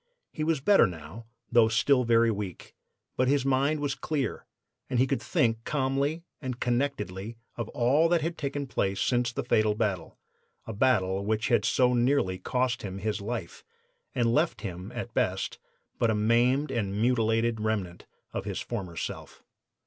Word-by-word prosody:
He 155 - -3
was 155 -3 +1
better 200 - +5
now, 90 +6 -9 0.2
though 120 -2 +6
still 125 +3 +3
very 115 0 +4
weak; 100 -4 -6 0.4
but 130 - +2
his 140 0 +2
mind 135 +3 +2
was 145 -1 0
clear, 150 -4 -3 0.4
and 125 - 0
he 130 - +5
could 135 0 -1
think 115 -1 +1
calmly 140 +4 -1 0.2
and 130 -3 -4
connectedly 115 -5 -2 0.2
of 115 -2 -4
all 140 +7 +3
that 170 -1 +3
had 165 +1 -2
taken 140 -1 -3
place 100 -7 -1
since 120 -1 +1
the - - -3
fatal 110 -1 +2
battle 100 -7 -2 0.5
a 115 - -5
battle 100 -5 +2
which 110 +2 0
had 120 - +3
so 125 -1 +3
nearly 120 -7 +2
cost 125 +4 0
him 95 -2 -5
his 105 +1 -2
life 105 -4 -5 0.5
and 115 -1 +2
left 155 +4 +1
him 90 -3 -6
at - - -6
best - - -1 0.4
but 115 - +3
a 110 - +2
maimed 120 +7 +2
and 100 -3 -2
mutilated 115 -1 +2
remnant 100 -5 -2 0.3
of - - -3
his - - -3
former 95 -8 -5
self. - - -6
120 Hz, 165 wpm, -28 LUFS, 105-135 Hz, 0.5 s, though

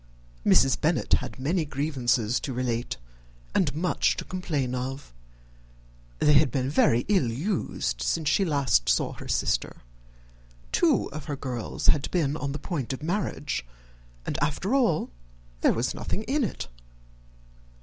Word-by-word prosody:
Mrs. 135 0 +4
Bennet 160 +2 +1
had - - +1
many 160 +7 0
grievances 130 -6 0
to 135 - -4
relate, 120 -1 -2 0.6
and - - +2
much 175 +3 +1
to - - -4
complain 150 -9 -2
of. 130 - -4 1.0
They 150 - +4
had 145 +1 +6
all 135 +2 -1
been 130 +2 -2
very 120 -5 +3
ill 190 - +3
used 115 - -2
since 150 - 0
she 175 +6 +3
last 140 - +2
saw - - +2
her - - -10
sister. - - -1 0.9
Two 330 -5 +3
of 155 - -7
her 145 - -3
girls 125 -5 -5
had 145 - +3
been 150 -5 +1
on 140 -3 -3
the 145 - -3
point 145 -7 -3
of 130 - -7
marriage, 155 - -2 0.6
and - - -2
after 160 - -1
all 235 - +2 0.5
there - - +5
was 120 +3 -1
nothing 215 - -3
in 275 +4 0
it. 65 - -3
145 Hz, 150 wpm, -27 LUFS, 125-165 Hz, 1.0 s, had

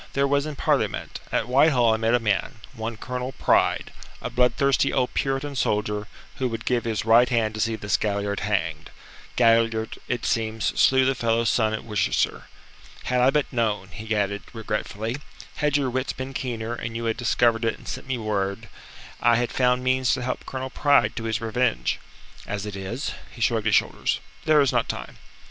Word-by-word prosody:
"There 140 0 +2
was 140 +1 +1
in 150 - -5
Parliament. - - -1
At 110 - 0
Whitehall 125 -3 +4
I - - +1
met 115 +1 +2
a - - +3
man 105 +3 0 0.2
one 115 0 -5
Colonel 125 +2 -4
Pride - - +2 0.3
a - - -5
bloodthirsty 130 +3 +2
old 125 -2 0
Puritan 135 +1 -1
soldier, 105 -3 0 0.3
who 130 - 0
would 115 -2 -5
give 120 -2 +1
his 110 -2 -1
right 115 +2 +6
hand 115 -3 +1
to 110 - -6
see 115 0 +1
this 105 -2 0
Galliard 100 -1 -1
hanged. 80 -7 -2 0.5
Galliard, 115 -1 +2
it 125 -2 -2
seems, 110 -1 -1 0.2
slew 130 0 +5
the 135 - +3
fellow's 115 -2 +1
son 110 -2 +2
at - - -7
Worcester. 105 -5 0 0.6
Had 125 0 +1
I 125 - +6
but 145 0 0
known," 105 -5 0
he 110 +4 -4
added 100 0 0
regretfully 110 +1 -3 0.4
"had 150 -1 +2
your 135 -3 0
wits 130 +2 -1
been 130 +1 -6
keener, 120 -3 -3
and 115 -1 -5
you 115 0 -3
had 115 -1 0
discovered 120 -1 +2
it 115 - 0
and - - -15
sent - - -6
me 130 -1 -1
word, 105 -1 -2 0.5
I 120 0 +5
had 120 +1 0
found 125 0 +2
means 130 0 +2
to 130 - -4
help 125 - -4
Colonel 130 0 -4
Pride 145 -1 +3
to 115 - -3
his 110 0 -1
revenge. 110 - 0 0.5
As 100 0 -3
it 105 -2 -5
is" 100 +9 -4 0.2
he - - -14
shrugged 115 -3 +1
his 110 - +4
shoulders - - +1 0.3
"there 155 -1 +5
is 140 - +3
not - - 0
time." - - -6
115 Hz, 190 wpm, -24 LUFS, 110-130 Hz, 0.6 s, right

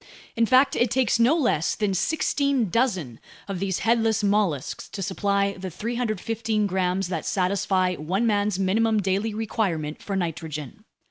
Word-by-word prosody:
In 230 0 +2
fact, 260 +3 +4
it 240 - +2
takes 245 -1 +1
no 245 +7 +5
less 235 - +1
than 210 -2 0
sixteen 280 - +1
dozen 185 - 0 0.3
of 195 -3 -4
these 190 -1 -1
headless 225 -1 +2
mollusks 200 -9 0
to 195 - -5
supply 200 +1 0
the 190 -1 -6
315 220 +1 -2
grams 185 -1 0
that 165 -4 -3
satisfy 185 -1 +1
one 185 +8 -1
man's 205 -3 +1
minimum 215 +3 +2
daily 200 +3 -1
requirement 190 -9 -2
for 200 - -4
nitrogen. 160 -6 -4
200 Hz, 145 wpm, -25 LUFS, 185-225 Hz, 0.3 s, no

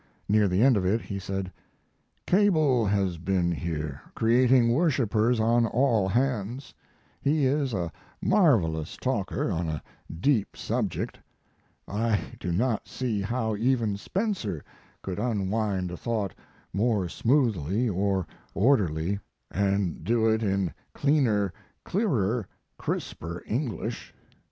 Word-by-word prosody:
Near 105 0 +4
the 95 +4 +2
end 130 -4 +6
of 95 - 0
it 100 +5 +2
he 100 -3 -5
said: 95 0 -4 0.7
Cable 155 - +3
has 95 -4 0
been 90 0 +1
here, 75 -3 -3
creating 120 +1 +4
worshipers 125 - +2
on 115 +1 +3
all 115 -4 +2
hands. 125 +1 -1 0.5
He 145 0 +2
is 135 0 +1
a 85 -6 -2 0.3
marvelous 110 - +2
talker - - -1
on 85 -1 -1
a 75 -1 -4 0.3
deep 105 - 0
subject. - - -2 0.7
I 105 +1 +1 0.2
do 90 - -3
not 110 +5 0
see 115 -6 -2
how 110 +1 -1
even 115 -2 +1
Spencer 115 - -2 0.4
could 95 0 -4
unwind 105 -4 -1
a 90 - -5
thought 110 -3 -2 0.4
more 105 -3 +1
smoothly 115 - +1
or 95 -2 0 0.3
orderly, 100 - +2 0.3
and 100 -2 0
do 115 -1 +2
it 110 0 +2
in 95 -5 0 0.2
cleaner, 115 - +2 0.3
clearer, 120 - 0 0.3
crisper 85 +2 -4
English. 120 - -3
110 Hz, 115 wpm, -27 LUFS, 95-125 Hz, 0.7 s, end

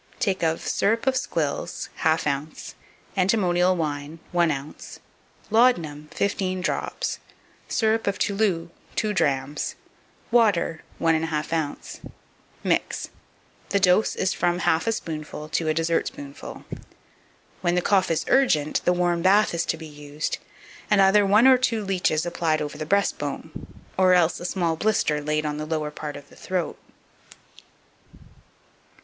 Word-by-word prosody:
Take 195 -3 0
of 160 -1 0
Syrup 225 +4 +1
of 265 -1 +2
squills 165 - -2
1/2 160 0 +2
ounce. 150 +1 -3 0.4
Antimonial 185 -2 +3
wine 150 -1 -3
1 175 -1 +3
ounce. 145 0 -6 0.5
Laudanum 170 -11 +3
15 190 -2 -1
drops. - - -2 0.5
Syrup 220 -1 +1
of 200 - 0
Toulou 195 -5 0 0.2
2 215 -1 0
drachms. 140 -5 -1 0.6
Water 205 -9 +3 0.2
1 165 -1 +3
1/2 155 -1 -2
ounce. 155 -3 -3 0.6
Mix. - - 0 0.6
The 200 - +2
dose 190 +2 +3
is 185 - 0
from 175 0 +1
half 160 +6 +2
a - - +3
spoonful 155 -6 -5
to 160 +1 -1
a 155 - +2
dessertspoonful. 160 -3 -3 1.0
When 175 0 +1
the 180 - +2
cough 190 -2 +3
is 165 - 0
urgent, 155 - +3
the 180 - +3
warm 175 -1 +1
bath 200 +3 +4
is 170 0 0
to 160 - 0
be 160 - -9
used, 150 0 -5 0.5
and 210 - +4
either 195 +1 +5
one 210 +5 +5
or 260 -1 +7
two 225 -4 0
leeches 180 -5 +1
applied 165 -2 0
over 150 -1 -4
the 155 - -5
breastbone, 160 -7 -1 0.5
or 185 -1 +6
else 175 -2 +3
a 175 - -7
small 175 -3 0
blister 160 -6 +1
laid 150 +1 -1
on 150 0 -2
the 155 0 -4
lower 155 -1 -2
part 150 -1 -6
of 145 0 -13
the - - -17
throat. 180 -3 -3
170 Hz, 145 wpm, -24 LUFS, 155-195 Hz, 1.0 s, or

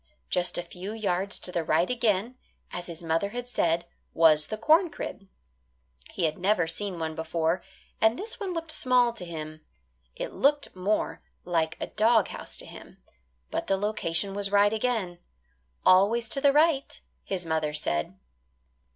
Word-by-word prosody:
Just 180 0 +1
a 175 - -2
few 180 +4 -7
yards 200 -2 0
to 180 - -3
the 170 -2 -1
right 160 +3 +2
again, 235 -1 0 0.4
as 175 0 -5
his 170 -1 -8
mother 165 +4 0
had 245 +3 -5
said, 170 -7 +1 0.3
was 155 -2 +5
the 215 - -4
corn 320 - +4
crib. 195 -9 -7 0.8
He 180 - -4
had 155 +1 -1
never 185 -1 +2
seen 185 +3 -3
one 160 -1 -3
before, 160 +2 -1 0.4
and 220 +2 +4
this 445 +3 -6
one 395 -3 -3
looked 330 -2 -4
small 250 -4 +3
to 230 - -9
him. 155 -2 -7 0.5
It - - -5
looked 290 -4 +1
more 195 +4 -1 0.2
like 165 -2 0
a - - -2
dog 220 -1 +3
house - - -7
to - - -7
him. - - -12 0.5
But - - -2
the 195 - +2
location 200 -2 -1
was 200 0 -2
right 205 +1 +4
again 220 -6 -1 0.7
"always 205 +6 +5
to 275 - 0
the 280 0 +6
right," 300 -1 +2 0.2
his 185 -3 -2
mother 160 -2 0
said. 95 - -2
195 Hz, 165 wpm, -27 LUFS, 165-235 Hz, 0.8 s, the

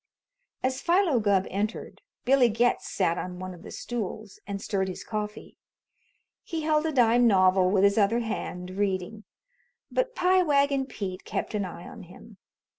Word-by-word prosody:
As 260 +1 -1
Philo 345 -7 +3
Gubb 200 -3 +2
entered, 210 +3 -4 0.2
Billy 260 -2 +5
Getz 235 +3 +1
sat 180 -3 0
on 180 0 -6
one 185 0 -6
of 175 - -13
the - - -10
stools 220 -3 -6
and 200 -1 -4
stirred 195 -1 -1
his 185 - -6
coffee. 210 -1 -6 0.8
He 325 -2 -5
held 310 0 +2
a - - -1
dime 245 -3 +4
novel 185 -2 +4
with 195 0 +2
his 200 +2 +4
other 220 +4 +2
hand, 185 -5 -5
reading; 195 +2 -2 0.7
but - - -1
Pie 370 -1 +3
Wagon 280 -4 +2
Pete 185 -7 -6
kept - - -4
an 205 -2 -1
eye 175 -1 -9
on 230 - -10
him. 185 +3 -14
215 Hz, 165 wpm, -27 LUFS, 190-260 Hz, 0.8 s, Billy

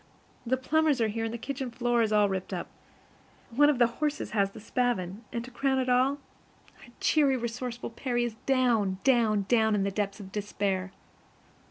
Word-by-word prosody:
The 260 +2 +2
plumbers 305 +1 +2
are 225 -1 +2
here, 225 +2 -2
and 225 - -3
the 235 - -4
kitchen 265 +2 -4
floor 240 0 +1
is 220 -1 +1
all 210 -1 +4
ripped 190 -1 -3
up. - - -5 0.8
One 290 +5 +5
of 280 -5 +1
our 240 - +6
horses 295 +5 -3
has 200 -2 +2
the 195 - -12
spavin. 220 -3 -2
And, 235 0 -4
to 255 - -11
crown 265 +2 0
all, 255 +3 +3 0.6
our - - -14
cheery, 280 -4 +3
resourceful 240 0 -4
Percy 240 0 -1
is 235 -2 -3
down, 235 -8 +2
down, 225 -6 +3
down 220 -2 +3
in 200 - +1
the 200 - -1
depths 200 +1 -2
of 190 -2 -10
despair. 195 -2 -2
235 Hz, 185 wpm, -28 LUFS, 210-255 Hz, 0.8 s, our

